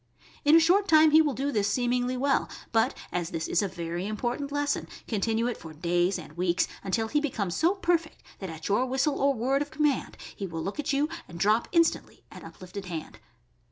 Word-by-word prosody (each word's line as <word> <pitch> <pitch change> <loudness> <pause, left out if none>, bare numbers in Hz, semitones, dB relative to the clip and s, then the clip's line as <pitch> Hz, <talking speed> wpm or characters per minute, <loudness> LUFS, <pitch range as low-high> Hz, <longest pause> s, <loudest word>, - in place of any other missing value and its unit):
In 295 +2 +6
a - - +9
short 370 +5 +3
time 315 -2 +6
he 315 +1 +7
will 295 -5 0
do 280 +2 -1
this 205 -5 +1
seemingly 245 +2 0
well, 275 +2 +1 0.2
but 225 -1 +2
as 175 -2 -2
this 160 -1 -3
is - - +2
a 200 - 0
very 175 0 -4
important 240 +6 -3
lesson, 290 0 -1 0.2
continue 225 +1 0
it 245 -1 -2
for 160 -1 -10
days 175 +4 +1
and - - -11
weeks 175 0 +1 0.2
until 220 +4 0
he 295 - +1
becomes 205 - -2
so 340 - +2
per 350 -3 +2
fect 320 -1 -17 0.2
that 190 - -5
at 160 -1 -7
your 225 +6 +2
whistle 270 +3 0
or 275 0 +3
word 265 +4 +1
of 290 - -3
command 295 -3 0 0.2
he 195 - -4
will 165 -2 -5
look 195 - -5
at 295 0 -1
you 285 +2 +2 0.2
and 170 - -10
drop 215 +5 +3
instantly 335 -2 +1
at - - -11
uplifted 190 +2 -9
hand. 165 -4 -7
240 Hz, 215 wpm, -27 LUFS, 185-290 Hz, 0.2 s, a